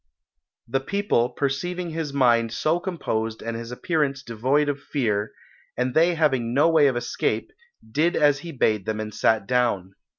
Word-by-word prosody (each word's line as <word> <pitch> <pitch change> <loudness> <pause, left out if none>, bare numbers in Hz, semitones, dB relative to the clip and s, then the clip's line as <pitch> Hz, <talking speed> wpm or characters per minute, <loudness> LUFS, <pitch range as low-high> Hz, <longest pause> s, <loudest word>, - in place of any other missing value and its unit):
The 135 +3 0
people, 165 - 0
perceiving 170 +7 -2
his 160 -2 -3
mind 120 -4 +3
so 155 +8 0
composed 115 - -3
and 115 +1 -4
his 115 +1 -6
appearance 145 -2 -1
devoid 130 +6 +1
of 145 -1 -1
fear, 105 -7 -1 0.5
and 125 0 0
they 170 +4 +4
having 130 -7 +1
no 150 +4 +4
way 155 -3 +5
of 130 -3 0
escape, 120 - -2 0.4
did 155 +10 +1
as 145 -2 +3
he 170 +3 -8
bade 110 -7 0
them 110 0 -2
and 110 0 -5
sat 110 0 +2
down. 110 -6 0
135 Hz, 165 wpm, -24 LUFS, 115-155 Hz, 0.5 s, way